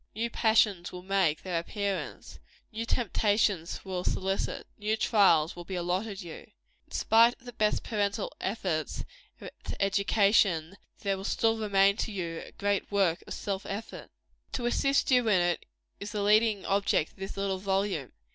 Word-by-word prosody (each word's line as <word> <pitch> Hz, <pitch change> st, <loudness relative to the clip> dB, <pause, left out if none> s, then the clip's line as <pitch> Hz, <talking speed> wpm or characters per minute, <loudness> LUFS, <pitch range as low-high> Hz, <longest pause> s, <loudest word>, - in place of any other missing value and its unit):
New 230 Hz, +2 st, -2 dB
passions 215 Hz, -6 st, +2 dB
will 180 Hz, 0 st, -8 dB
make 190 Hz, -5 st, +1 dB
their 180 Hz, -3 st, -1 dB
appearance 200 Hz, +2 st, -4 dB, 0.3 s
new 225 Hz, +1 st, -4 dB
temptations 205 Hz, -6 st, 0 dB
will 185 Hz, -2 st, -3 dB
solicit 195 Hz, +1 st, -2 dB
new 215 Hz, +1 st, 0 dB
trials 190 Hz, -7 st, +4 dB
will 175 Hz, -, -8 dB
be 190 Hz, +2 st, -6 dB
allotted 185 Hz, +3 st, -2 dB
you, 165 Hz, -2 st, -10 dB, 0.4 s
In -, -, -32 dB
spite 230 Hz, +2 st, +4 dB
of -, -, -25 dB
the 245 Hz, -, -8 dB
best 215 Hz, -1 st, +1 dB
parental 205 Hz, -1 st, -1 dB
efforts 185 Hz, -7 st, -2 dB, 0.4 s
at -, -, -8 dB, 0.3 s
education, 195 Hz, -3 st, +2 dB, 0.3 s
there 195 Hz, -2 st, 0 dB
will 190 Hz, -, -7 dB
still 225 Hz, +2 st, +1 dB
remain 200 Hz, -1 st, +3 dB
to 225 Hz, -, -2 dB
you 170 Hz, -4 st, -4 dB
a -, -, -12 dB
great 205 Hz, 0 st, -1 dB
work 190 Hz, -4 st, +2 dB
of -, -, -5 dB
self 195 Hz, -1 st, -3 dB
effort. 205 Hz, +3 st, -6 dB, 0.4 s
To 245 Hz, -, -2 dB
assist 275 Hz, +3 st, +2 dB
you 250 Hz, -2 st, +4 dB
in 200 Hz, -4 st, +4 dB
it, 175 Hz, 0 st, 0 dB, 0.3 s
is 205 Hz, +2 st, -6 dB
the 205 Hz, -1 st, -1 dB
leading 210 Hz, -1 st, +3 dB
object 195 Hz, -5 st, +1 dB
of -, -, -29 dB
this 195 Hz, +1 st, -6 dB
little 195 Hz, -1 st, -1 dB
volume. 190 Hz, -7 st, -1 dB
200 Hz, 165 wpm, -29 LUFS, 185-215 Hz, 0.4 s, trials